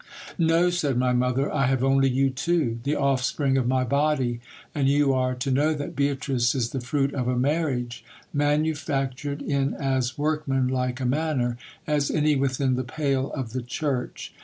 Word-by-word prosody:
No, 165 +2 +3
said 145 -7 0
my 125 0 +2
mother, 125 +2 +1
I 140 -3 +2
have 130 -1 +1
only 135 0 +3
you 135 +1 +2
two, 135 -4 0
the 145 +2 +1
offspring 135 0 +1
of 130 -3 +1
my 130 0 +2
body; 135 -2 +1 0.3
and 140 -2 +1
you 140 -1 +3
are 130 -1 0
to 125 +2 -2
know 150 +4 +2
that 145 -1 -5
Beatrice 135 -3 0
is 120 -3 -1
the 135 - -3
fruit 135 +2 0
of 125 -3 -2
a 125 0 0
marriage, 125 -4 -1 0.3
manufactured 145 -2 -1
in 140 -1 0
as 130 -2 -1
workmanlike 135 -4 0
a - - -1
manner 130 -3 0 0.3
as 150 -2 +1
any 150 -1 +2
within 135 -1 +1
the 130 - -1
pale 135 0 -1
of 125 -6 -4
the 130 - -2
church. 125 +1 -3
135 Hz, 170 wpm, -25 LUFS, 125-145 Hz, 0.3 s, No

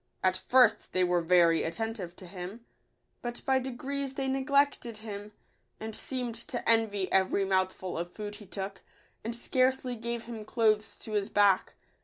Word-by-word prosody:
At 185 0 +3
first 235 +4 +3
they 185 - +3
were 180 -1 +2
very 170 -1 +5
attentive 195 -1 -3
to 185 - -11
him; 185 +5 -8 0.6
but 240 0 -6
by 265 -1 +3
de 260 +1 -4
grees 270 +2 -3
they 270 -1 -1
neglected 270 -3 +1
him, 205 -1 -6 0.5
and 220 0 -5
seemed 250 -3 -2
to 235 +2 -5
envy 215 -4 +3
every 190 +1 +3
mouthful 185 -2 0
of 175 +1 -4
food 210 0 -6
he 205 -2 -13
took, 195 +1 -5 0.4
and 230 +2 -3
scarcely 255 +1 +1
gave 235 0 -4
him 225 -2 -7
clothes 215 -1 +1
to 220 - -8
his 205 -2 0
back. 200 -2 +3
220 Hz, 165 wpm, -30 LUFS, 190-245 Hz, 0.6 s, very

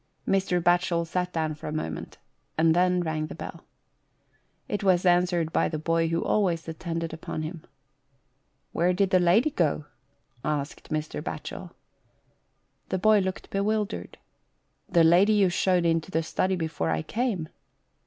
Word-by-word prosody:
Mr. 190 -2 +2
Batchel 175 -1 +2
sat 180 +2 -2
down 160 -2 -1
for 150 - -9
a - - -3
moment, 80 - -5 0.4
and 160 0 +4
then 180 0 +3
rang 155 -2 -2
the - - -8
bell. - - -8 1.0
It 205 -1 -3
was 185 -2 +3
answered 175 -2 +2
by - - +2
the 155 - -3
boy 165 +1 +1
who 165 +1 0
always 175 -6 +1
attended 165 0 -4
upon 160 -1 -5
him. 160 +1 -6 0.5
" - - -46
When 180 +2 +1
did 195 0 +1
the 185 - +5
lady 190 - +4
go? 155 - 0 0.3
" - - -45 0.2
asked 150 -1 -3
Mr. 155 -1 -3
Batchel. - - -6 1.2
The 190 - 0
boy 215 +3 +5
looked 190 -1 -4
bewildered. 210 +1 -1 0.4
" - - -45 0.3
The 170 -2 +4
lady 180 +6 +5
you 200 -3 +4
showed 180 0 +2
into 165 +1 +1
the 165 -3 0
study 185 +4 0
before 160 - -2
I 80 -1 0
came." 220 -9 -2
175 Hz, 160 wpm, -27 LUFS, 160-185 Hz, 1.2 s, the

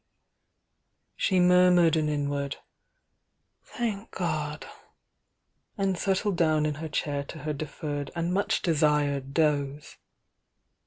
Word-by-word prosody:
She 190 -2 +1
murmured 180 -2 +5
an 155 -1 +1
inward 145 -1 -2 1.1
"Thank 225 -3 -4
God!" 155 -4 -3 1.1
and 195 -2 +1
set 190 +2 0
tled 205 -1 -1
down 155 -2 +2
in 150 - 0
her 160 - -4
chair 145 -1 -2
to 160 - -9
her 155 0 -2
deferred 145 -1 -5
and 170 +1 -1
much 200 +2 0
de 165 -3 +2
sired 145 -2 +1
doze. 145 -2 0
155 Hz, 115 wpm, -27 LUFS, 145-180 Hz, 1.1 s, murmured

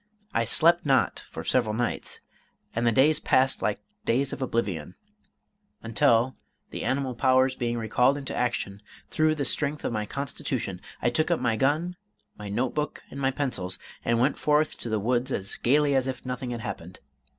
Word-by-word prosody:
I 115 - +2
slept 170 +9 +4
not 135 -3 +2
for - - -7
several 110 -4 +1
nights, 120 +1 -2 0.5
and 120 +1 +1
the - - +5
days 145 +6 +4
passed 130 +1 +2
like 105 - -1 0.2
days 135 +4 +1
of - - -6
oblivion; 100 -10 -2 0.9
until, 115 +3 +3 0.4
the - - -5
animal 135 -1 0
powers 130 +1 +3
being 120 -1 -1
recalled 125 +5 +2
into 140 -2 -5
action 105 -5 -2 0.3
through 155 0 +2
the 145 -2 -2
strength 150 +2 +1
of - - -1
my 105 -1 -2
constitution, 130 -8 -3 0.2
I 120 - +3
took 155 +7 +1
up 170 - +2
my 120 -3 +1
gun, 155 +8 0 0.4
my 105 -1 -8
note 120 +5 -1
book, 150 -1 -3
and 140 - -7
my 135 -1 +2
pencils, 125 -10 -2 0.3
and 115 0 +1
went 130 +5 +2
forth 150 +1 +2
to 120 - -5
the 110 - +1
woods 125 +4 0
as 100 -4 -1
gayly 145 +3 +3
as 135 -1 +2
if 130 0 -5
nothing 125 0 -4
had 120 -1 -4
happened. 90 -6 -7
125 Hz, 180 wpm, -27 LUFS, 115-140 Hz, 0.9 s, the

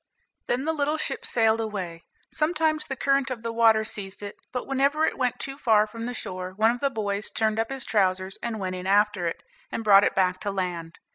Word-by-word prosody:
Then 255 +3 0
the 320 - +1
little 300 0 0
ship 275 - -3
sailed 225 -1 +2
away; 185 -6 -5 0.3
sometimes 310 -1 +1
the 270 - -3
current 275 0 +1
of 240 -3 -5
the 230 0 -3
water 225 -1 +5
seized 200 -2 -6
it, 205 - -6 0.2
but 250 -1 -3
whenever 280 +3 +2
it - - -1
went 250 -2 0
too 275 +1 -6
far 220 -6 +4
from 230 +2 -7
the 245 - -3
shore 185 -3 -5
one 220 +3 +4
of 245 - -4
the 280 - +1
boys 210 -4 -3
turned 220 0 0
up 225 - 0
his 270 -1 -5
trousers, 190 -2 +1
and 230 -2 -3
went 185 -1 -3
in 185 0 -5
after 205 -2 +3
it, 165 - -4 0.3
and 225 - -3
brought 200 -2 +7
it - - +1
back 185 -1 +2
to 205 - -3
land. 180 -4 -3
220 Hz, 225 wpm, -26 LUFS, 195-260 Hz, 0.3 s, brought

